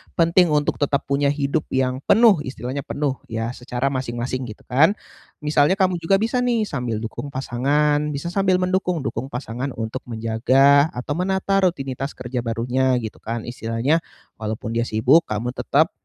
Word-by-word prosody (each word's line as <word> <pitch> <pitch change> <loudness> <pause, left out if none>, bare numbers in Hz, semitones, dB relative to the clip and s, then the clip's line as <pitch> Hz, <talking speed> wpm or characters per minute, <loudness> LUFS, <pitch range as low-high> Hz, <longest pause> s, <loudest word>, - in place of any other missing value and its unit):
penting 170 +1 +4
untuk 150 -1 0
tetap 145 -1 +1
punya 140 +1 +1
hidup 140 +1 0
yang 130 0 0
penuh, 220 -5 +6
istilahnya 130 +2 -4
penuh, 140 -2 -2
ya 115 +1 -3
secara 125 +2 -3
masing-masing, 130 -1 -3
gitu 110 - -11
kan. 155 +10 +3 0.5
Misalnya 150 +3 +3
kamu 185 -3 +1
juga 165 +4 +2
bisa 225 +5 0
nih, 240 -3 +1
sambil 125 - -3
dukung 115 +5 -5
pasangan 145 +3 0
bisa 155 +5 -4
sambil 190 0 +2
mendukung, 180 -3 0
dukung 130 -1 -3
pasangan 125 +1 -5
untuk 115 +3 -4
menjaga 130 +6 +3
atau 125 +4 -5
menata 190 +4 +1
rutinitas 135 -6 -1
kerja 125 0 -4
barunya, 125 +3 0
gitu 110 - -7
kan. 115 0 -4
Istilahnya 120 +6 0 0.4
walaupun 110 +1 -4
dia 115 +1 0
sibuk, 130 +10 +4
kamu 110 +3 -2
tetap 145 +4 +1
135 Hz, 155 wpm, -22 LUFS, 120-160 Hz, 0.5 s, penuh